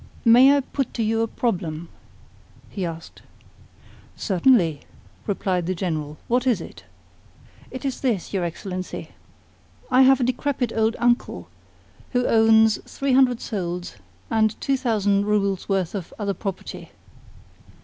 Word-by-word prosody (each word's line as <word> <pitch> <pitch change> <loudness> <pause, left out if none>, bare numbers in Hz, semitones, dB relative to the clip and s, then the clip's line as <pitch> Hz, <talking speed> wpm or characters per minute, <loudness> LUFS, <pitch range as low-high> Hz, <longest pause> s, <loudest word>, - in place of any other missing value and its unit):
"May 255 +5 +7
I - - +1
put 275 -1 -4
to 230 - 0
you 225 +1 +1
a 230 - +1
problem?" 175 -9 -3 0.8
he 190 -4 -3
asked. 165 0 -9 0.9
"Certainly," 185 - +2 0.5
replied 185 -4 -1
the 185 - -1
General. 155 -4 -3
"What 245 +2 +1
is 235 -7 +3
it?" 105 - -11 0.8
"It 260 +2 -8
is 270 -2 -3
this, 230 -10 -1
your 190 -3 0
Excellency. 185 +2 -5 0.8
I 255 +1 +6
have 265 +1 +6
a - - +1
decrepit 250 -1 -1
old 225 +1 +1
uncle 240 0 0 0.6
who 245 0 +2
owns 220 -1 +4
three 275 -1 -1
hundred 255 -2 +4
souls 175 - -4 0.3
and 220 -1 +1
two 275 - 0
thousand 205 -5 +1
roubles 200 -3 0
worth 190 -4 0
of 190 -5 -6
other 200 -2 -2
property. 195 -1 -6
215 Hz, 135 wpm, -23 LUFS, 185-245 Hz, 0.9 s, May